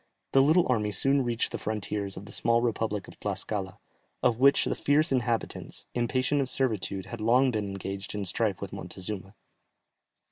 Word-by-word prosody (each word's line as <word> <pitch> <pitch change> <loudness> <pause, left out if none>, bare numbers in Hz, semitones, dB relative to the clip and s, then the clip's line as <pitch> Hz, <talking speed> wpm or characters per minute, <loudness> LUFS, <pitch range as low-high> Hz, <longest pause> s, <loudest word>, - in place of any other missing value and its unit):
The 135 - +6
little 160 +6 +5
army 105 -4 +1
soon 135 +7 +2
reached 120 -1 -1
the - - -4
frontiers 105 -2 -3
of 100 - -7
the 105 - -11
small 115 0 +2
republic 110 -4 -1
of - - -14
Tlascala, - - -3 0.5
of 115 -1 +3
which 140 +1 +5
the - - 0
fierce 150 +2 +2
inhabitants, 120 -3 -2
impatient 130 +4 +1
of 130 - -1
servitude, 105 -8 -1
had 115 -2 -7
long 125 +4 +4
been 105 -3 -1
engaged 95 0 -5
in 105 -1 -2
strife 100 +1 0
with 100 - -6
Montezuma. 95 +2 -5
115 Hz, 170 wpm, -28 LUFS, 100-130 Hz, 0.5 s, The